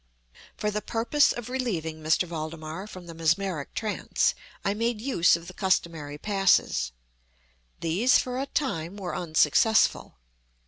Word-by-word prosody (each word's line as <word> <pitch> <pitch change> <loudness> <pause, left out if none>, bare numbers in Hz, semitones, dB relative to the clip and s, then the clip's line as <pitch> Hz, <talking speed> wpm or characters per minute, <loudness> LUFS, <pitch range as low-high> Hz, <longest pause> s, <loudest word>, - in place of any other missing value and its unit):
For 210 0 -1
the 210 0 -2
purpose 240 +7 +2
of 240 -1 -5
relieving 175 -12 -3
M. 155 - -2 0.2
Valdemar 160 +3 -6
from 185 -4 -10
the 170 - -9
mesmeric 165 -1 -1
trance, 215 -2 0 0.3
I 200 - +2
made 230 +1 -1
use 215 -10 +3
of 170 0 -7
the 185 - -9
customary 165 -6 -1
passes. 195 - +2 0.9
These, 195 - +3
for 250 0 -2
a 275 - -2
time, 195 - -2
were 180 -5 -4
unsuccessful. 165 - +2
185 Hz, 135 wpm, -27 LUFS, 160-220 Hz, 0.9 s, use